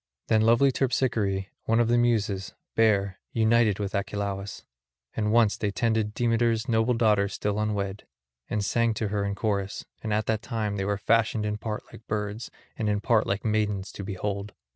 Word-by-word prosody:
Them 110 -1 +4
lovely 115 +5 +5
Terpsichore, 115 -7 0 0.2
one 115 +1 +2
of 120 - +3
the 120 - +3
Muses, 110 -5 +1 0.2
bare, 100 -4 +2
united 110 -2 +3
with 100 -2 -3
Achelous; 100 0 -3 0.5
and 105 -1 0
once 115 -2 +4
they 105 - -1
tended 110 +1 0
Demeter's 115 0 +1
noble 115 +1 +2
daughter 105 -3 +3
still 105 +1 -2
unwed, 105 -2 -2 0.4
and 105 -2 -1
sang 115 0 +1
to 110 -1 -2
her 100 0 -1
in 100 0 -2
chorus; 100 -2 -2 0.2
and 110 - -3
at 105 0 +1
that 110 -1 0
time 110 -4 -2
they 95 - -1
were 100 0 0
fashioned 110 +1 +2
in 105 0 -2
part 105 -1 -4
like 115 - -13
birds 105 +2 -3 0.3
and 110 -2 -1
in 105 0 +1
part 110 0 +2
like 100 +3 -2
maidens 105 -3 0
to 100 - -7
behold. 100 +1 -4
105 Hz, 180 wpm, -27 LUFS, 100-115 Hz, 0.5 s, lovely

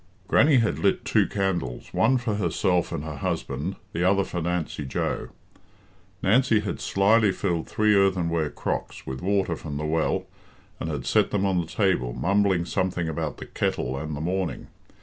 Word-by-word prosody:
Grannie 145 +5 +5
had 115 -3 +1
lit - - +1
two - - +3
candles 90 -11 -2
one 130 - +3
for 120 -3 -2
herself 90 -1 +1
and 70 - -3
her 75 -2 -6
husband, 70 +6 -3 0.2
the 85 - -1
other 100 +2 +3
for 90 -2 -4
Nancy 85 -3 -2
Joe. 65 - -2 0.9
Nancy 115 +1 +4
had 100 - -4
slyly 105 +1 +3
filled 85 -3 -2
three 105 0 +3
earthenware 85 -5 +2
crocks - - -4
with 65 0 -5
water 95 -3 +1
from 75 -2 -6
the 75 - -3
well, 80 +1 0 0.5
and 80 - -3
had 70 -5 -4
set - - +3
them 100 -1 0
on 95 -2 +2
the 80 - -6
table, 90 - +1
mumbling 100 -2 +2
something 90 -2 -1
about 80 - -3
the - - -8
kettle 65 - -2
and 75 +2 -4
the 75 - -5
morning. 90 +1 -2
90 Hz, 170 wpm, -25 LUFS, 80-100 Hz, 0.9 s, Grannie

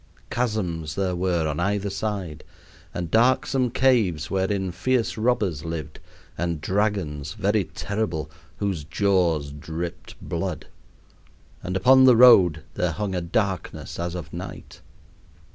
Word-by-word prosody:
Chasms 90 - -2
there 95 -2 -1
were 85 -3 0
on 75 -1 -2
either 100 +2 0
side, 95 -6 -4 0.5
and 85 -2 -5
darksome 125 +2 +3
caves 115 - +2
wherein 95 -1 0
fierce 120 +6 0
robbers 110 - 0
lived, 80 -3 -6 0.4
and 85 -1 -1
dragons, 90 -6 -1
very 105 -1 +1
terrible, 85 -6 -3 0.3
whose 95 -7 -2
jaws 85 -4 +1
dripped 80 +4 -6
blood. - - -4 1.0
And 90 +1 -2
upon 130 +7 +6
the 125 -2 +7
road 90 -11 +7
there 85 -2 -1
hung 100 +4 -3
a 90 - -1
darkness 95 +1 -2
as 85 0 -3
of 90 - -7
night. - - -8
95 Hz, 125 wpm, -24 LUFS, 80-105 Hz, 1.0 s, the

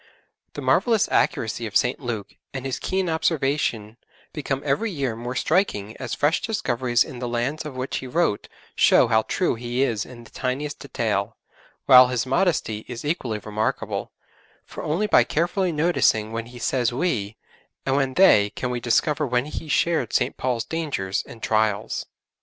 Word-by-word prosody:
The - - -6
marvellous 225 -3 +3
accuracy 115 -6 0
of 105 - +2
St. 125 - 0
Luke 120 -6 -5 0.2
and 130 0 -4
his 135 - -2
keen 190 -1 -1
observation 140 -9 0 0.4
become 140 -3 -3
every 145 +11 +1
year 140 - -2
more 120 +2 -5
striking 125 - 0
as - - -4
fresh 150 +3 +1
discoveries 125 - +1
in 125 - -9
the 125 - -3
lands 125 +6 -2
of 150 -4 -7
which 130 +1 -3
he 130 - -6
wrote 155 -6 0 0.3
show - - +5
how 110 -1 +4
true 180 - 0
he 120 +3 -1
is 115 -6 0
in 120 -2 -12
the - - -17
tiniest 140 +3 -3
detail; 110 -6 -2 0.5
while 130 -2 +9
his 125 -1 -1
modesty 130 - 0
is 120 +2 -7
equally 130 -8 -1
remarkable, 110 +1 -3 0.5
for - - -8
only 170 +8 0
by 210 - +5
carefully 175 +3 0
noticing 150 -9 +2
when 115 0 -4
he 120 +1 -12
says 120 0 0
'we' 115 - -2 0.5
and 135 - +1
when 135 -2 0
'they' 105 - +6
can 125 - -2
we 125 - -2
discover 140 +5 +1
when 125 +1 +1
he 155 +1 -6
shared 150 -5 +1
St. - - +1
Paul's 125 -3 -1
dangers 135 -13 -2
and 115 - -12
trials. 110 -1 0
125 Hz, 170 wpm, -24 LUFS, 115-150 Hz, 0.5 s, while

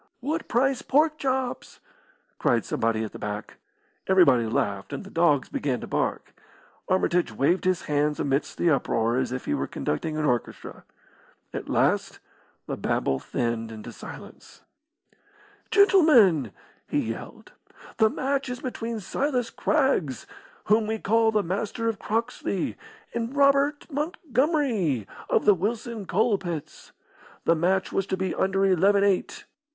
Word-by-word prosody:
"What 310 +6 -3
price 260 +2 +1
pork 305 +2 +2
chops?" 260 -2 -2 0.6
cried - - +2
somebody 110 -1 0
at 110 - -5
the - - -10
back. 105 0 -6 0.5
Everybody 140 -12 +5
laughed, 100 -3 -2
and - - -5
the 195 - -12
dogs 150 -5 +2
began 130 -4 -2
to - - -5
bark. - - -2 0.6
Armitage 180 -5 +1
waved 140 - +1
his 185 -1 +1
hands 150 0 0
amidst 140 +1 -1
the 170 - +2
uproar 115 -4 +1
as 130 -2 -1
if 130 0 -4
he - - -1
were 70 -1 -1
conducting 155 - -3
an 155 - 0
orchestra. 120 -4 -3 0.7
At - - -5
last - - +1 0.5
the - - -4
babel 65 - 0
thinned 115 -1 -3
into 110 -1 -8
silence. - - -12 1.1
"Gentlemen," 250 - +5 0.4
he - - -1
yelled, - - -10 0.5
"the 220 - +5
match 275 +3 -1
is 250 0 -4
between 235 -3 -4
Silas 250 +4 -1
Craggs, 225 - 0 0.4
whom 215 +1 +2
we 220 0 -1
call 225 +1 +2
the 210 -2 +1
Master 205 +5 -2
of 220 -3 -1
Croxley, 225 -4 -2 0.4
and 235 +3 -3
Robert 280 +1 +3
Montgomery, 270 - 0 0.2
of - - +2
the 210 - +7
Wilson 215 +2 -3
Coal 215 +1 +2
pits. 170 -5 -7 0.5
The 165 - +5
match 185 +4 +1
was 195 0 -1
to 190 - -1
be 190 -1 -1
under 195 +1 +1
eleven 195 +2 +4
eight. 195 -2 0
195 Hz, 140 wpm, -26 LUFS, 145-245 Hz, 1.1 s, the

